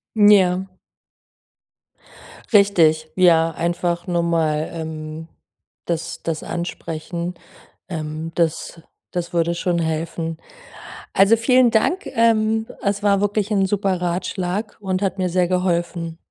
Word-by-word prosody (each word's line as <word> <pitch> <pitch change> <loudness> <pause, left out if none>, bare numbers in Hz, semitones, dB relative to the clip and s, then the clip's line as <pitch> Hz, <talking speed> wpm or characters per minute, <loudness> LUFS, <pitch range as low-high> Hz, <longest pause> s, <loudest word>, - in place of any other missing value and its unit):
Ja. 190 -3 +4 1.8
Richtig, 165 -7 +4
ja, 165 -3 +5
einfach 175 +1 -2
normal, 165 -3 0
ähm, 160 -1 -6 0.6
das 165 -1 -3
das 165 -2 -3
ansprechen. 170 0 -5 0.5
Ähm, 160 -1 -5
das 165 0 -1 0.3
das 175 -1 -3
würde 170 0 +1
schon 170 0 -1
helfen. 165 0 -3 0.8
Also, 200 +4 +5
vielen 250 +2 +4
Dank, 350 - +1
ähm, 225 -1 +2
es 200 0 -1
war 200 -1 +3
wirklich 205 +1 0
'n 195 -2 +3
super 190 -2 0
Ratschlag 180 +3 -2
und 190 -1 -2
hat 195 -1 -1
mir 185 -1 0
sehr 180 0 +2
geholfen. 170 -2 -1
175 Hz, 110 wpm, -21 LUFS, 165-200 Hz, 1.8 s, ja